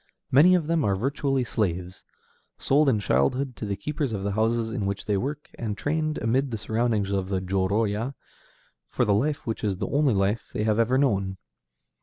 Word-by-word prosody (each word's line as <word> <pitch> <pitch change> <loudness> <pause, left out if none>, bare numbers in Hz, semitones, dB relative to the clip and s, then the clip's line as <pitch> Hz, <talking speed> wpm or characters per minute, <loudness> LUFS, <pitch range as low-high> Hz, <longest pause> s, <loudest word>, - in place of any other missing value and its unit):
Many 165 +8 +7
of 170 -4 +1
them 165 -1 +1
are 100 -4 +2
virtually 135 +4 0
slaves, 90 -6 -3 0.5
sold 145 +1 +3
in 110 -5 +2
childhood 115 - +1
to 105 - -5
the 100 - -1
keepers 140 +4 -3
of 100 -2 -3
the 100 - -1
houses 110 +2 0
in 110 -5 -2
which 100 0 -3
they 105 - 0
work, 145 +8 -4
and 105 -3 -3
trained, 155 +1 -1
amid 130 +5 +1
the 115 - -3
surroundings 110 -2 0
of 95 -1 -1
the 95 -1 0
jōrōya, 100 +6 0 0.7
for 125 - 0
the 105 - +3
life 145 +8 0
which 115 -1 -4
is 100 -3 0
the - - -3
only 140 -5 +2
life 100 +4 0
they - - -1
have 110 0 +1
ever 120 +3 +3
known. 100 -8 +1
115 Hz, 195 wpm, -26 LUFS, 100-135 Hz, 0.7 s, Many